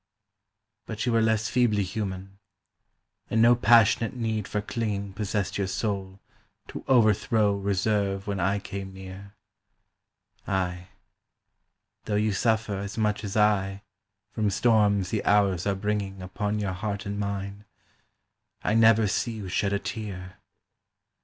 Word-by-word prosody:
But 110 +1 -4
you 125 - +1
were 115 0 +3
less 110 -1 +1
feebly 115 -5 +2
human, 95 0 -5 0.9
and 110 - +1
no 120 +2 +7
passionate 115 0 +4
need 110 -4 -2
for 105 - -2
clinging 105 -2 -3
Possessed 100 -1 -2
your 100 - 0
soul 100 -1 -3 0.5
to - - -7
overthrow 110 -3 +3
reserve 100 0 0
when 100 -2 -3
I 95 +3 +1
came 100 -1 -7
near; 95 +2 -10 1.1
Ay, 90 -2 -2 1.2
though 105 - -1
you 105 0 +1
suffer 110 -1 0
as 100 +2 -6
much 105 -1 0
as 100 0 -3
I 100 -2 +2 0.5
from 105 -2 0
storms 100 -3 +2
the 110 - -1
hours 100 -3 +2
are 100 - +1
bringing 100 -1 -3
Upon 105 +3 -2
your 100 -3 -2
heart 100 +2 -4
and 100 0 -4
mine, 100 0 -4 1.0
I 105 - +1
never 115 0 +5
see 115 +3 -1
you 105 -4 -6
shed 100 +2 0
a 100 - +2
tear. 95 -4 -6
100 Hz, 135 wpm, -26 LUFS, 95-110 Hz, 1.2 s, no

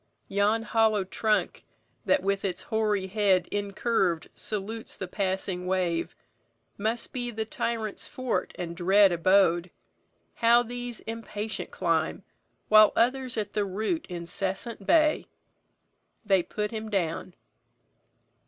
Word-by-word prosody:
Yon 205 +3 +2
hollow 220 -3 +2
trunk, 215 +3 0 0.4
That 285 - +3
with 200 0 0
its 185 -2 -3
hoary 210 -3 0
head 190 -2 +2
incurv'd 200 -4 0
salutes 220 +2 -5
The 190 - -5
passing 185 -1 -2
wave, 180 -3 0 0.6
must 220 +3 -2
be 245 -1 -2
the 220 -1 -3
tyrant's 220 -1 -3
fort 250 -8 -2
And 170 -1 -5
dread 190 +3 +5
abode. 175 0 +3 0.6
How 235 +1 +4
these 245 0 -6
impatient 220 -1 -5
climb, - - -1 0.4
While 215 0 +7
others 255 +1 +1
at 205 -2 -2
the 210 - +1
root 215 - -2
incessant 190 +5 -4
bay! 310 -2 +4 1.0
They 195 -3 +4
put 210 +4 -3
him 220 -1 -5
down." 180 -2 -2
205 Hz, 115 wpm, -27 LUFS, 190-225 Hz, 1.0 s, While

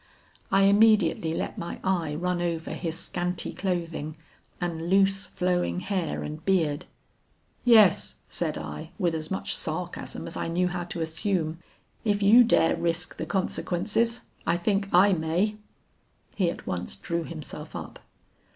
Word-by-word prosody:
I 195 0 +5
immediately 200 -5 +4
let - - -3
my 170 - -5
eye 170 -6 0
run 180 +2 -1
over 170 -1 -2
his 165 -2 -3
scanty 180 0 -3
clothing 165 -5 -3 0.4
and 170 -1 -3
loose 195 0 +3
flowing 180 0 0
hair 185 -3 -2
and 155 +1 -6
beard. 160 -7 +1 0.8
'Yes,' 220 -6 +5
said - - -2
I, 75 -1 -6
with 175 -5 +1
as 155 -1 -4
much 190 - -2
sarcasm 170 +3 -4
as 165 - -5
I - - -2
knew 180 +2 +1
how 175 0 -3
to 170 -1 -5
assume, 160 0 -1 0.4
'if 205 -2 +1
you 225 +5 +8
dare 225 -8 +3
risk 170 0 -1
the - - -4
consequences, 205 +4 0 0.3
I 170 - +3
think 195 +2 0
I 195 +3 +6
may.' 175 +6 0 0.8
He 185 -4 +1
at - - -7
once 90 0 -3
drew 170 0 -3
himself 160 -3 -7
up. - - -7
175 Hz, 145 wpm, -27 LUFS, 165-195 Hz, 0.8 s, you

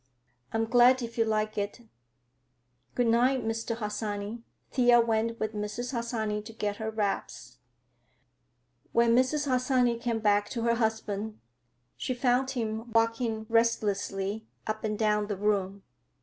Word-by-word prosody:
"I'm 225 0 0
glad 245 +2 +5
if 230 0 -6
you 225 - +4
like 215 -1 0
it. 205 +4 -4 1.1
Good 245 - +2
night, 245 +2 +3
Mr. 225 +1 -2
Harsanyi." 210 0 -4 0.3
Thea 245 -2 +5
went 230 0 +1
with 215 0 -2
Mrs. 210 +4 -4
Harsanyi 230 -4 -2
to 225 +1 -10
get 205 -2 -2
her 220 -1 -3
wraps. 195 - -3 1.3
When 235 0 +4
Mrs. 260 +4 +2
Harsanyi 250 -2 +2
came 235 -2 0
back 205 -1 +2
to 230 -2 -3
her 235 0 +3
husband, 220 -2 -2 0.6
she 255 - -2
found 250 +1 +2
him 225 -2 -3
walking 225 -1 +1
restlessly 215 -2 0 0.2
up 215 0 -3
and 215 -1 -1
down 210 -1 +1
the 205 -2 -3
room. 200 -1 0
225 Hz, 135 wpm, -29 LUFS, 210-240 Hz, 1.3 s, glad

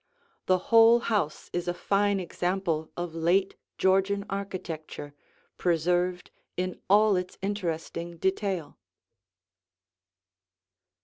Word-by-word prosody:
The 185 - +4 0.2
whole 230 +1 +8
house 210 -10 -2
is 175 0 -2
a 175 - -1
fine 200 +1 +1
example 175 -3 -2
of 175 -2 -4
late 175 +4 +1 0.2
Georgian 195 +1 +2
architecture, 175 -7 -5 0.4
preserved 180 +1 0 0.3
in 185 0 -3
all 210 +1 +5
its 180 0 -3
interesting 170 -3 -3
detail. 190 -3 -2
185 Hz, 90 wpm, -28 LUFS, 170-200 Hz, 0.4 s, whole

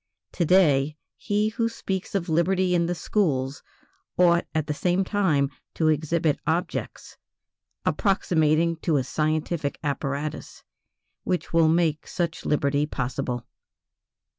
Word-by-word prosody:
To 175 - 0
day, 150 -5 +3 0.2
he 210 +1 0
who 230 +1 -1
speaks 190 -4 -4
of 190 -2 -1
liberty 180 +3 +2
in 170 -1 +2
the 175 - -1
schools 145 -9 -1 0.6
ought 170 -1 +4
at 155 -2 +1
the 150 - -2
same 180 +5 +1
time 165 -9 +1 0.2
to 160 -1 +2
exhibit 155 0 +1
objects 165 +3 -3 0.7
approximating 165 -4 +2
to 160 -2 +1
a 135 - +1
scientific 155 +1 -1
apparatus 145 +1 -4 0.6
which 180 -2 -2
will 165 -1 +5
make 160 -2 +1
such 170 -2 -3
liberty 145 0 +1
possible. 125 -2 -3
160 Hz, 120 wpm, -25 LUFS, 150-180 Hz, 0.7 s, will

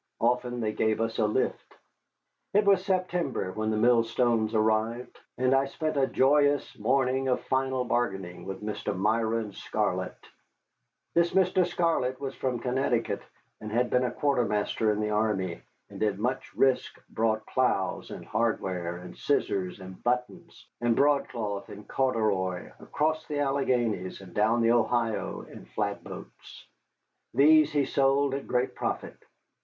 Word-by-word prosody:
Often 125 0 0
they 110 -1 0
gave 110 0 0
us 115 0 -1
a 110 - +3
lift. 105 - -2 0.8
It 210 0 +5
was 195 -2 +4
September 180 - -1
when 110 +2 -2
the 110 - 0
millstones 115 -1 +2
arrived, 110 +3 0 0.2
and 130 +1 +2
I 135 0 +4
spent 155 +2 -3
a 135 -1 +3
joyous 145 +1 +3
morning 130 +3 +1
of 125 - +2
final 130 -1 0
bargaining 95 -8 -2
with 95 +2 -6
Mr. 105 -2 -3
Myron 110 +1 0
Scarlett. - - -2 1.0
This 170 0 +2
Mr. 185 -1 +3
Scarlett 165 -7 0
was 135 -1 -4
from 130 -2 -2
Connecticut, 125 -1 0 0.4
had 115 +3 -1
been 125 - +3
a 125 - +1
quartermaster 115 -5 +1
in 105 0 -1
the 105 0 -1
army, 105 -5 0 0.3
and - - -9
at 105 -2 +1
much 125 +5 -2
risk 135 -1 +1
brought 110 -1 0
ploughs 125 -7 0
and - - -8
hardware, 95 -6 -1
and 90 0 -10
scissors 100 -10 -1
and 95 0 -10
buttons, 125 0 -3 0.2
and 120 -1 +2
broadcloth 115 -8 0
and 105 0 -10
corduroy, 105 -8 0
across 155 +1 -1
the 150 - -3
Alleghanies, 125 -9 0
and 95 -3 -13
down 110 +4 +2
the 115 - +4
Ohio 120 -1 0
in - - -12
flatboats. - - -6 0.7
These 155 +3 +6
he 145 -2 +2
sold 135 +1 +2
at 140 - -4
great 125 +1 0
profit. - - -4
120 Hz, 140 wpm, -28 LUFS, 105-135 Hz, 1.0 s, These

